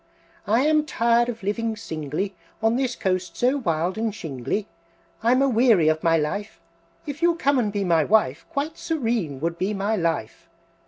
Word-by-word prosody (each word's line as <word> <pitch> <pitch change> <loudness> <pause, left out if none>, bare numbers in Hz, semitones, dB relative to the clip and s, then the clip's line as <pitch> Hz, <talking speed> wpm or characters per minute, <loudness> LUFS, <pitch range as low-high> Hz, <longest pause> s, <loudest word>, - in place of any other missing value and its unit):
"I 225 +4 +3
am 305 +1 +2
tired 235 -1 +2
of 230 -3 -6
living 220 +3 -1
singly 160 0 -4 0.3
On 225 +1 +3
this 255 -2 0
coast 185 -1 -2
so 255 +3 +2
wild 175 - -1
and 225 0 0
shingly, 160 - -3 0.5
I'm 250 +4 +3
a - - +3
weary 225 - +4
of 155 0 0
my 165 -1 +3
life; 200 +8 -3 0.5
If 290 +2 -6
you'll 340 0 +4
come 280 -5 +2
and 215 -4 0
be 200 -1 -1
my 165 -4 +3
wife, 170 -9 +2
Quite 310 0 -3
serene 225 - -1
would 170 +1 -2
be 200 +3 -1
my 200 +3 0
life!" 165 - -2
215 Hz, 175 wpm, -24 LUFS, 170-245 Hz, 0.5 s, weary